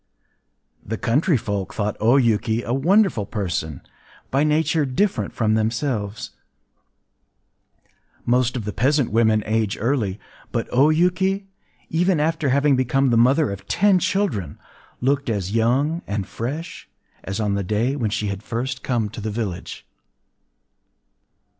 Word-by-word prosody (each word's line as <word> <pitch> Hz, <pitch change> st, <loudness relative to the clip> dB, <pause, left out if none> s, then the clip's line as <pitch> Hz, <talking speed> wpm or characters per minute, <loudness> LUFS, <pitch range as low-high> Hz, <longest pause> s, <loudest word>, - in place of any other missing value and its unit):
The 110 Hz, +2 st, -4 dB
country 140 Hz, +6 st, +2 dB
folk 100 Hz, -5 st, -4 dB
thought 105 Hz, -1 st, -1 dB
O 115 Hz, +5 st, +4 dB
Yuki 115 Hz, -2 st, +1 dB
a 120 Hz, -, -2 dB
wonderful 165 Hz, -, +2 dB
person, 85 Hz, -, -3 dB, 0.5 s
by 135 Hz, +2 st, +2 dB
nature 155 Hz, +1 st, +2 dB
different 130 Hz, -, 0 dB
from 110 Hz, -2 st, 0 dB
themselves. 110 Hz, -1 st, -2 dB, 1.9 s
Most 125 Hz, +1 st, +2 dB
of 110 Hz, -, -5 dB
the 105 Hz, -, -4 dB
peasant 140 Hz, 0 st, +1 dB
women 110 Hz, -1 st, +3 dB
age 110 Hz, -2 st, 0 dB
early; 110 Hz, -5 st, -1 dB, 0.3 s
but 115 Hz, -2 st, -2 dB
O 135 Hz, +5 st, +4 dB
Yuki, 185 Hz, +4 st, +1 dB, 0.5 s
even 175 Hz, +1 st, +2 dB
after 155 Hz, -1 st, 0 dB
having 140 Hz, +1 st, +3 dB
become 130 Hz, +1 st, +1 dB
the -, -, +3 dB
mother 130 Hz, +4 st, +3 dB
of 100 Hz, -, -8 dB
ten 200 Hz, -1 st, +3 dB
children, 185 Hz, -, -1 dB, 0.4 s
looked 135 Hz, +1 st, +1 dB
as 100 Hz, -4 st, -2 dB
young 135 Hz, +9 st, +1 dB
and 100 Hz, -1 st, -2 dB
fresh 125 Hz, -, -6 dB, 0.3 s
as 95 Hz, +3 st, -4 dB
on 105 Hz, -2 st, 0 dB
the 100 Hz, 0 st, -1 dB
day 110 Hz, +8 st, 0 dB
when 120 Hz, -7 st, -1 dB
she 105 Hz, 0 st, -2 dB
had 100 Hz, -1 st, -3 dB
first 125 Hz, +4 st, -4 dB
come 120 Hz, -4 st, -1 dB
to 110 Hz, +1 st, -8 dB
the 110 Hz, -, -3 dB
village. 100 Hz, -5 st, -5 dB
120 Hz, 140 wpm, -22 LUFS, 105-145 Hz, 1.9 s, O